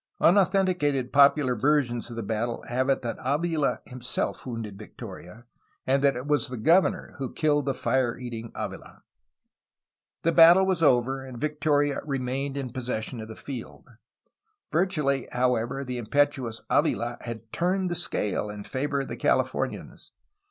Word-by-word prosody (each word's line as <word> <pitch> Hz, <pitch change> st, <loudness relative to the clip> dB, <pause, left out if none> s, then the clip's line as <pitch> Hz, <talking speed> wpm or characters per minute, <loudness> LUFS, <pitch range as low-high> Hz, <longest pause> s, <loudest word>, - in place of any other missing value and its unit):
Unauthenticated 180 Hz, -8 st, +3 dB
popular 140 Hz, -2 st, +5 dB
versions 120 Hz, -2 st, +1 dB
of 120 Hz, -, -7 dB
the 115 Hz, -, -4 dB
battle 115 Hz, +3 st, -2 dB
have 130 Hz, +2 st, 0 dB
it 135 Hz, -, +1 dB
that 115 Hz, -, -3 dB
Avila 150 Hz, +2 st, 0 dB
himself 125 Hz, +1 st, -4 dB
wounded 110 Hz, -5 st, -6 dB
Victoria, 105 Hz, 0 st, -10 dB, 0.4 s
and 135 Hz, +1 st, +2 dB
that 140 Hz, -2 st, +4 dB
it 125 Hz, +2 st, -5 dB
was 145 Hz, 0 st, +1 dB
the 125 Hz, -, -6 dB
governor 170 Hz, -, +2 dB
who 130 Hz, -3 st, -3 dB
killed 145 Hz, -3 st, +1 dB
the 135 Hz, -, +2 dB
fire 130 Hz, -3 st, 0 dB
eating 115 Hz, -2 st, -7 dB
Avila. -, -, -7 dB, 1.2 s
The 165 Hz, -, +3 dB
battle 170 Hz, +3 st, +8 dB
was 185 Hz, -3 st, 0 dB
over, 135 Hz, -2 st, +3 dB
and 130 Hz, -2 st, -9 dB
Victoria 145 Hz, -1 st, +1 dB
remained 135 Hz, 0 st, -2 dB
in 130 Hz, -3 st, -4 dB
possession 125 Hz, -2 st, -4 dB
of 110 Hz, -, -7 dB
the 110 Hz, -, -9 dB
field. 130 Hz, -5 st, -8 dB, 0.8 s
Virtually, 150 Hz, -7 st, +1 dB
however, 125 Hz, +2 st, 0 dB
the 125 Hz, -1 st, -3 dB
impetuous 130 Hz, -1 st, 0 dB
Avila 120 Hz, +1 st, +1 dB
had 115 Hz, -2 st, -8 dB
turned 185 Hz, +1 st, 0 dB
the -, -, -1 dB
scale 105 Hz, -, -1 dB
in 105 Hz, 0 st, -7 dB
favor 140 Hz, +3 st, -2 dB
of 135 Hz, -, -6 dB
the -, -, -5 dB
Californians. -, -, -1 dB
130 Hz, 150 wpm, -26 LUFS, 120-145 Hz, 1.2 s, battle